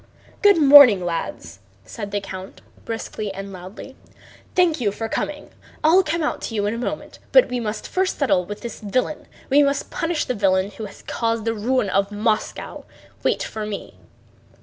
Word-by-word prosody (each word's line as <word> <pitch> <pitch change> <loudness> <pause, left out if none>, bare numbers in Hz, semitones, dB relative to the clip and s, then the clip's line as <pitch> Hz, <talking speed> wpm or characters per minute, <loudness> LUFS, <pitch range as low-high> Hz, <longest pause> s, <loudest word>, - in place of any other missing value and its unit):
"Good 405 -2 +6
morning, 275 - +8
lads!" 95 - -4 0.3
said 200 - -7
the 205 0 -1
count 190 -1 -9 0.2
briskly 220 -2 -4
and 195 0 -7
loudly. 185 +8 -10 0.6
"Thank 340 -6 +3
you 205 -4 +1
for 225 +2 -4
coming. 295 +6 -4 0.3
I'll 330 +5 +6
come 335 -2 -2
out 300 - -2
to 225 - -5
you 205 -1 0
in 205 - 0
a 230 - -4
moment, 245 - -5
but - - +6
we 250 - -2
must 215 -2 -4
first 375 +1 -1
settle 255 -11 +2
with 205 +3 -8
the 235 - -4
villain. 250 +8 -2 0.2
We 285 +2 +6
must 280 -1 0
punish 330 -2 -1
the 250 - -1
villain 195 -2 +1
who 215 +2 -7
has 200 - -12
caused 230 -1 -1
the 225 - +1
ruin 225 -1 0
of 195 +1 +1
Moscow. 215 +1 -2 0.4
Wait - - 0
for 220 - -5
me!" 210 -1 -6
225 Hz, 180 wpm, -22 LUFS, 200-280 Hz, 0.6 s, morning